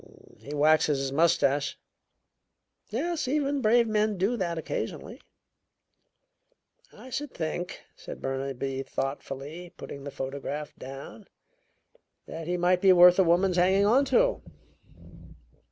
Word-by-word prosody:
"He 145 +2 -7
waxes 150 0 +3
his 135 0 -2
mustache." 145 -2 +2 1.1
"Yes, 310 +6 -2
even 285 0 0
brave 235 +1 +4
men 215 -1 +1
do 195 +7 +1
that 175 -6 -2
occasionally." 160 - -5 1.7
"I 260 - -13
should 290 +2 -4
think," 175 +2 -4
said - - -9
Burnaby 135 0 -3
thoughtfully, 140 +5 -5
putting 140 - -9
the 140 - -5
photograph 140 +2 -5
down, 135 - -10 1.0
"that 160 0 -7
he 180 0 -1
might 180 +1 +2
be 195 - +6
worth 180 0 +7
a - - +7
woman's 180 +2 +2
hanging 190 +3 +4
on 245 +7 +4
to." - - +2
175 Hz, 120 wpm, -27 LUFS, 140-210 Hz, 1.7 s, worth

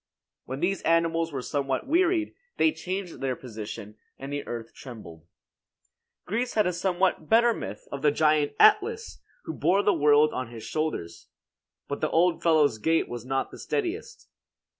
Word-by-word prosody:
When 130 +2 -6
these 195 +2 0
animals 165 0 +1
were 135 -3 -4
somewhat 135 -2 -2
wearied, 335 +2 +2 0.2
they 315 - +4
changed 185 - -5
their 130 -2 -1
position, 110 -3 -8 0.2
and 135 +1 -7
the 145 - -4
earth 115 -1 -6
trembled. 85 - -11 1.0
Greece 235 +6 -2
had 215 -2 +3
a 180 - 0
somewhat 180 -3 0
better 235 +1 +5
myth - - -7
of 140 - -5
the 150 - +4
giant 150 0 +2
Atlas, 430 +2 +3 0.2
who - - -5
bore 195 +3 +2
the 205 - +4
world 150 -1 +4
on 130 -2 -4
his 115 -2 -9
shoulders; 115 - -4 0.6
but 140 - -4
the 155 - +1
old 170 +1 +2
fellow's 155 -9 +3
gait 160 +8 +1
was 120 0 -7
not 135 0 0
of - - -24
the - - -11
steadiest. 415 +1 -4
155 Hz, 165 wpm, -27 LUFS, 130-195 Hz, 1.0 s, better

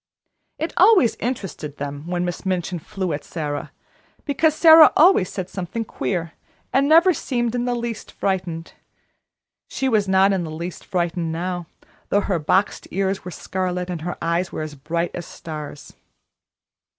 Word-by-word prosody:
It 320 - -3
always 375 - +6
interested 195 - -4
them 145 +2 -6
when 175 0 -1
Miss 175 -1 -4
Minchin 180 -2 -2
flew 185 +1 -3
at 145 - -4
Sara, 145 -3 -4 0.5
because 310 +2 +2
Sara 320 -1 +9
always 325 - +5
said 185 -2 -4
something 190 +5 -4
queer, 170 -5 -3 0.4
and 275 +2 +3
never 340 +4 +6
seemed 240 -6 -2
in 245 0 -1
the 245 -1 0
least 235 -2 -5
frightened. 180 -4 -3 0.9
She 270 - -2
was 215 -5 +2
not 190 +1 +4
in 185 -2 0
the 160 - -5
least 170 +3 -6
frightened 170 -2 -1
now, 175 +1 -3 0.4
though 205 - +3
her 190 -4 -1
boxed 190 +6 +1
ears 195 0 -1
were 180 - -6
scarlet, 180 0 -3
and 170 -3 -4
her 175 +2 -4
eyes 170 +2 0
were - - -4
as 155 -1 -6
bright 165 +5 -2
as 175 - -6
stars. 150 -2 -8
185 Hz, 160 wpm, -22 LUFS, 170-230 Hz, 0.9 s, Sara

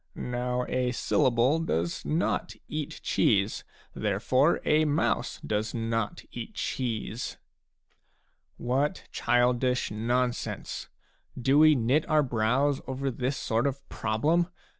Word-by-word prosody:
Now 125 0 -2
a 125 -1 0
syllable 125 +5 +2
does 85 - -1
not 160 +3 -1
eat 155 -2 -5
cheese. - - +2 0.3
Therefore 115 - +2
a 155 +1 +4
mouse 150 0 0
does 105 +1 -1
not 115 -1 -2
eat - - -7
cheese." 115 -2 -3 1.2
What 135 +8 0
childish 125 0 +1
non 120 +3 +1
sense! - - -6 0.5
Do 135 +4 +4
we 155 0 +7
knit 130 +7 +1
our 155 -1 +4
brows 125 +4 +1
over 135 +1 -2
this 130 +3 -2
sort 115 +4 0
of 140 0 -5
problem 150 +11 +1
125 Hz, 115 wpm, -28 LUFS, 115-145 Hz, 1.2 s, we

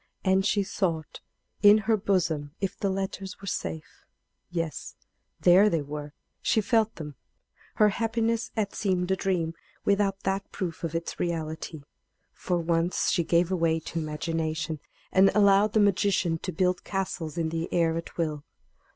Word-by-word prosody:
And 190 0 +3
she 205 0 +2
sought 170 -5 -2 0.4
in 205 0 +8
her 225 - +4
bosom 170 -7 0
if 195 -2 -2
the 200 - -1
letters 195 0 -4
were 195 - -10
safe. 80 - -5 0.5
Yes; 165 -3 -4 0.4
there 185 +4 +6
they 165 -6 0
were; 145 0 -7 0.3
she - - +2
felt 220 +1 +2
them. 150 -2 -7 0.6
Her 210 -1 +5
happiness 225 +1 0
had 210 -2 -1
seemed 185 -2 0
a - - +4
dream 180 -4 -1 0.3
without 200 -1 +1
that 195 +1 -2
proof 175 -3 -4
of 165 -1 -3
its 165 0 -4
reality. 160 -2 -3 0.5
For 180 - -1
once 170 +1 +1
she 170 - +2
gave 170 +2 +2
way 165 -3 +2
to 165 +1 -5
imagination, 160 0 -2 0.3
and 190 +1 +6
allowed 200 0 +5
that 220 - +4
magician 195 -4 +2
to 185 - -4
build 180 +2 0
castles 180 -5 -3
in 165 -1 0
the 165 +1 -3
air 165 -2 +2
at 165 - -6
will. 155 -4 -2
180 Hz, 155 wpm, -27 LUFS, 165-195 Hz, 0.6 s, in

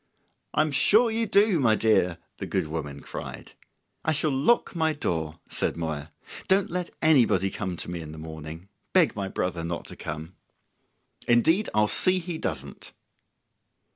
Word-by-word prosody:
"I'm 155 0 +3
sure 215 - +4
you 225 0 0
do, 200 -3 +4
my 115 -5 +4
dear," 100 -6 +2 0.2
the - - -5
good - - 0
woman 75 -3 -5
cried. - - -8 0.5
"I 155 - +2
shall 155 0 0
lock 145 - +2
my 160 -1 +2
door," 80 - -2
said - - -2
Moya. 80 -2 -4 0.4
"Don't 190 -1 +3
let 180 0 -2
anybody 120 - +4
come 95 -4 -4
to - - -5
me 85 -1 -4
in 75 -1 -8
the 80 - -10
morning; 80 +2 -8 0.3
beg 180 -4 +4
my 100 -2 -2
brother 90 -3 -2
not 85 0 -4
to - - -9
come." 80 +3 -6 0.9
"Indeed 160 - +3
I'll 105 0 +5
see 185 - +3
he 175 -2 -4
doesn't." - - -5
110 Hz, 160 wpm, -26 LUFS, -, 0.9 s, I'll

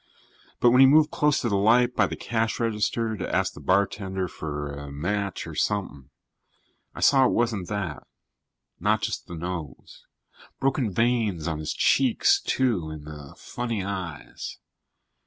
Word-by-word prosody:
But 120 - +5
when 125 +2 +6
he 135 - +9
moved 150 +2 +5
closer 150 -1 +1
to 120 - +1
the 100 - +1
light 120 +4 +4
by - - +3
the - - -5
cash 115 -1 -2
register 115 0 0
to 95 - -3
ask - - +1
the - - -11
bartender 95 -1 0
for 75 -3 -5
a 70 0 -8
match 100 +7 -2
or - - -8
something, 75 -10 -2 0.9
I - - -7
saw 135 -2 +5
it - - 0
wasn't 110 -6 0
that. 95 -7 -4 0.7
Not - - +1
just - - -3
the 85 - -7
nose. 85 -5 -7 0.5
Broken 130 -5 0
veins 110 -6 0
on 80 -2 -2
his 75 - -3
cheeks, 275 - +3
too, 115 - 0
and 75 -1 -8
the 75 -2 -10
funny 115 -5 -4
eyes. 95 -6 -6
100 Hz, 155 wpm, -25 LUFS, 85-120 Hz, 0.9 s, he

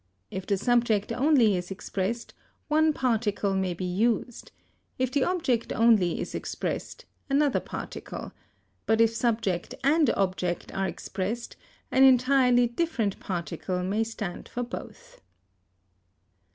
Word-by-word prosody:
If 190 -1 -5
the 200 - +2
subject 230 -1 +2
only 250 -4 +4
is 180 0 -4
expressed, 195 +4 -3 0.4
one 310 +1 +4
particle 220 -7 0
may 190 -2 0
be 185 - -4
used; 220 +5 -1 0.5
if 255 0 0
the 280 -1 +2
object 320 -11 0
only 220 -7 +3
is - - -5
expressed, - - -4 0.2
another 280 0 +3
particle; - - -7 0.6
but 220 0 +3
if 230 0 +4
subject 220 -6 -1
and 295 0 +4
object 185 -2 -1
are 195 0 0
expressed 200 +6 -4 0.4
an 265 - +5
entirely 255 -1 +5
different 235 - -1
particle 180 0 -3
may 205 +4 0
stand 215 -5 -6
for 245 - -3
both. 235 -2 -9
225 Hz, 125 wpm, -27 LUFS, 195-250 Hz, 0.6 s, an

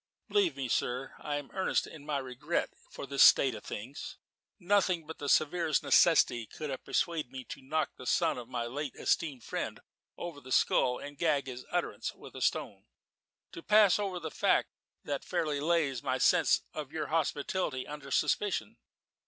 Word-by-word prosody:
"Believe 400 -5 +2
me, 135 - -2
sir, 125 +2 -1
I 145 - -3
am 145 -1 -5
earnest 190 - +1
in 150 -2 -12
my 150 -2 0
regret 135 +5 -2 0.2
for - - -7
this 140 0 0
state 135 -2 +7
of 105 - -8
things. 125 +7 -7 0.4
Nothing 185 -3 +2
but 160 +1 -9
the 145 - -3
severest 155 -1 +2
necessity 120 -9 +4
could 150 +4 -6
have 130 - -5
persuaded 155 -7 -1
me 130 -1 -7
to - - -7
knock 155 +4 -1
the 130 - -9
son - - +2
of 120 -1 -10
my 120 -2 -2
late 140 +2 -4
esteemed 145 -8 0
friend - - -4 0.4
over 165 -5 -6
the 130 0 -12
skull 125 0 +3
and 145 0 -9
gag 155 -4 +2
his 125 -1 -8
utterance - - -2
with - - -13
a - - -7
stone - - -1 0.7
to - - -8
pass 210 +1 +5
over 195 -3 -2
the 160 -2 -6
fact - - +2 0.3
that 140 -1 -3
it - - -18
fairly 160 -5 -1
lays 150 -5 +1
my 130 - -1
sense 165 +5 +4
of 150 -3 -6
your 155 -2 -3
hospitality 155 -2 -1
under 145 -2 -8
suspicion. 205 +6 0
145 Hz, 180 wpm, -31 LUFS, 130-165 Hz, 0.7 s, state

